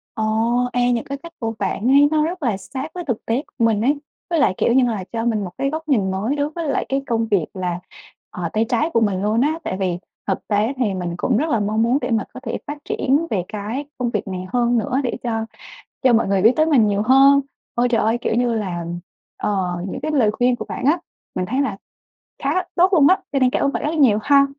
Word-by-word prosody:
Ồ, 220 - -2 0.5
ê, 245 0 +2
những 235 -2 0
cái 280 - -5
cách 335 0 -10
của 225 -2 -2
bạn 205 +3 -1
ấy, 280 +2 +6
nó 310 -1 +3
rất 345 0 -4
là 230 -7 +1
sát 265 +9 -6
với 360 - -5
thực 240 -5 -2
tế 235 +5 0
của 230 - -1
mình 220 -2 +2
ấy. 280 +6 +2 0.3
Với 335 -2 +1
lại, 275 - +3
kiểu 235 - +2
nhưng 255 -1 +4
là, 210 -5 -3
cho 225 0 -2
mình 220 -3 +1
một 185 - -4
cái 275 - 0
góc 315 +2 -5
nhìn 205 -9 +2
mới 210 +9 -1
đối 290 0 0
với 320 -1 -4
lại - - 0
cái 270 0 0
công 230 -1 0
việc 200 -7 +2
là, 180 -2 -3 0.5
ờ, 175 -2 -4
tay 220 +1 +2
trái 250 +7 +1
của 230 - +3
mình 200 -4 +1
luôn 215 +3 +1
á, 310 +4 +1
tại 185 - -3
vì 185 -3 -1 0.3
thực 190 - -2
tế 215 +4 +1
thì 230 -6 0
mình 175 -2 -3
cũng 235 +4 +1
rất 310 +6 0
là 230 - +2
mong 215 +2 +1
muốn 240 +3 +3
để 245 - -2
mà 220 -3 +2
có - - -8
thể 230 - -3
phát 290 +1 -4
triển 285 +5 +1
về 190 -4 0
cái 220 +7 -4
công 250 -2 -1
việc 210 -2 -3
này 185 -1 -4
hơn 240 -1 +2
nữa 255 +3 0
để 245 - -2
cho 225 -2 -1 0.6
cho 255 -2 +5
mọi 230 - +3
người 195 -1 +2
biết 225 +5 +6
tới 310 - +3
mình 270 -9 +4
nhiều 205 0 +1
hơn. 270 +4 +6 0.3
Ôi 240 +1 +2
trời 240 - +2
ơi! 225 +2 +2
Kiểu - - 0
như 240 0 +2
là, 185 -6 -3 0.5
ờ, 185 -4 -1
những - - -5
cái 310 - -2
lời 245 -8 +3
khuyên 245 +3 +2
của - - -6
bạn 255 - -5
á, 300 +5 +4 0.4
mình 185 - -1
thấy 255 +8 0
là 220 -9 -2 0.7
khá - - +1 0.3
tốt 365 +3 +4
luôn 300 -5 +6
á, 375 - +5
cho 275 - +1
nên 255 -1 +4
cảm - - -1
ơn 280 - +2
bạn - - -3
rất 300 - -1
nhiều 260 -10 +4
ha. 280 -1 +5
235 Hz, 260 wpm, -21 LUFS, 210-275 Hz, 0.7 s, ấy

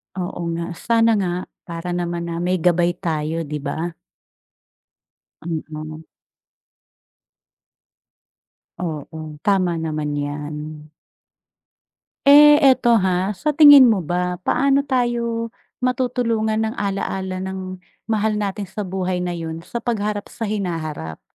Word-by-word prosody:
Oo 180 -1 -4
nga, 170 +1 -4
sana 230 +5 +2
nga, 180 -2 0 0.4
para 170 +1 -5
naman 175 -1 -2
na 165 - -3
may 180 +1 +1
gabay 175 0 +2
tayo, 160 -1 -2
'di 150 0 -5
ba? 165 +3 -4 1.5
Mm. 155 -1 -6 2.8
Oo, 155 -2 -6
tama 185 -3 +3
naman 155 -2 -2
'yan. 150 +1 -6 1.3
Eh, 295 +1 +9
eto 240 -3 +5
ha, 185 +2 0
sa 300 -1 0
tingin 290 -3 +9
mo 215 -6 +3
ba 180 +2 -2
paano 275 +7 +2
tayo 240 -3 -1 0.2
matutulungan 245 -3 0
ng 220 +1 -1
ala-ala 195 -2 -3
ng 185 0 -5 0.3
mahal 220 0 +1
natin 205 -1 -2
sa 190 +3 -6
buhay 185 -1 -2
na 180 - -2
yun 165 0 -5
sa 235 - -6
pag-harap 210 -3 -2
sa - - -19
hinaharap? 155 - -4
185 Hz, 110 wpm, -21 LUFS, 165-220 Hz, 2.8 s, Eh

